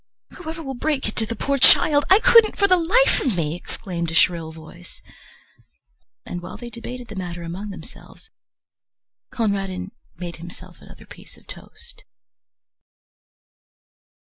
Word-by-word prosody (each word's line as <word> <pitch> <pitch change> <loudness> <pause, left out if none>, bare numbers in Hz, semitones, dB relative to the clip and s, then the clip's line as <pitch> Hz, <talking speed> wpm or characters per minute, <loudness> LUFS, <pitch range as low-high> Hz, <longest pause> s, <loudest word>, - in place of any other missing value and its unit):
"Whoever 325 -2 -7
will 270 -2 -4
break 275 +1 -1
it 210 - -5
to 220 - 0
the 230 - -4
poor 275 +5 -1
child? 290 +2 +5
I 380 - +8
couldn't 455 0 +6
for 400 - +4
the 370 - +6
life 385 +9 +3
of 235 -9 0
me!" 155 -2 0
exclaimed 175 -2 -5
a 165 - -4
shrill 165 -1 +3
voice. 155 - -13 1.3
And 175 - -5
while 180 +1 -8
they 240 -1 -9
debated 245 +2 -8
the 215 - -9
matter 175 -2 -5
among 185 +5 -6
themselves, 180 0 -13 1.0
Conradin 195 -4 -2 0.2
made 175 -2 -7
himself 170 +1 -12
another - - -14
piece - - -15
of - - -21
toast. - - -11
205 Hz, 145 wpm, -22 LUFS, 175-280 Hz, 1.3 s, I